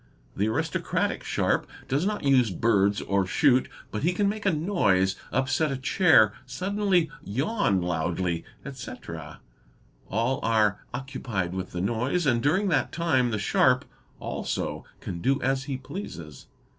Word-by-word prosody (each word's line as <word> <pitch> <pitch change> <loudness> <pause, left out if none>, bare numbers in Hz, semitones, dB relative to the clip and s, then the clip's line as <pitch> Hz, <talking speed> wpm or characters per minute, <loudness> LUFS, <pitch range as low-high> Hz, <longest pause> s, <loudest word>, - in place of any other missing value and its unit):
The 100 +2 +1
aristocratic 110 - -1
sharp - - 0 0.2
does 145 +8 +1
not 210 0 -2
use 130 -5 +4
birds 100 +1 +2
or 100 0 +1
shoot, 130 +5 +3 0.2
but 105 - -3
he 170 +5 +2
can 200 +2 +1
make 205 +1 -2
a - - +5
noise, 125 - +2 0.2
upset 130 +4 +1
a 135 - -2
chair, 130 - +4
suddenly 185 +3 +1
yawn 130 - 0
loudly, 85 0 -1 0.2
etc.,—all 100 - -6
are 110 -3 +2
occupied 120 -8 -3
with 95 0 -4
the 90 - -3
noise, 125 - 0
and 120 -4 +2
during 185 - +2
that 140 -7 +1
time 145 -7 +1
the 110 - -1
sharp, 100 - +3 0.3
also, - - -3 0.2
can 85 -2 -5
do 135 +6 +2
as 135 0 0
he 135 -2 -3
pleases. 85 - -8
125 Hz, 140 wpm, -26 LUFS, 95-150 Hz, 0.3 s, a